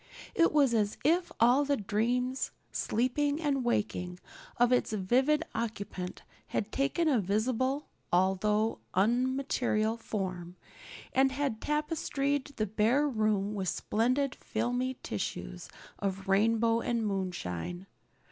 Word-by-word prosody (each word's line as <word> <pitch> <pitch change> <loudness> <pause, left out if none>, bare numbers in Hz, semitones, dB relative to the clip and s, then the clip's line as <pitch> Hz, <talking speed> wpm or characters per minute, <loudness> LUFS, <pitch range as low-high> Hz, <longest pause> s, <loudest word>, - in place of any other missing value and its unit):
It 335 - +4
was 280 -5 +4
as 210 -2 +1
if 345 +5 +2
all 245 +5 +5
the 285 0 +1
dreams, 245 +5 0 0.2
sleeping 285 +6 0
and 285 -5 0
waking, 180 -6 -1 0.4
of 245 +1 +4
its 250 -3 +2
vivid 260 +10 +2
occupant 200 -5 -4 0.2
had 215 0 -2
taken 285 +5 +1
a 270 -6 +4
visible 250 +8 0 0.3
although 200 +4 +2 0.2
unmaterial 240 0 +1
form 185 -6 -4 0.6
and 265 +1 +4
had 270 -5 -2
tapestried 290 -2 -1
the 215 - 0
bare 225 +8 +2
room 215 -5 +1
with 190 -3 -1
splendid 255 +5 0
filmy 245 +3 -2
tissues 80 - -4 0.3
of 195 0 -3
rainbow 225 +3 +3
and 235 -2 0
moonshine. 180 - -3
230 Hz, 115 wpm, -30 LUFS, 205-270 Hz, 0.6 s, all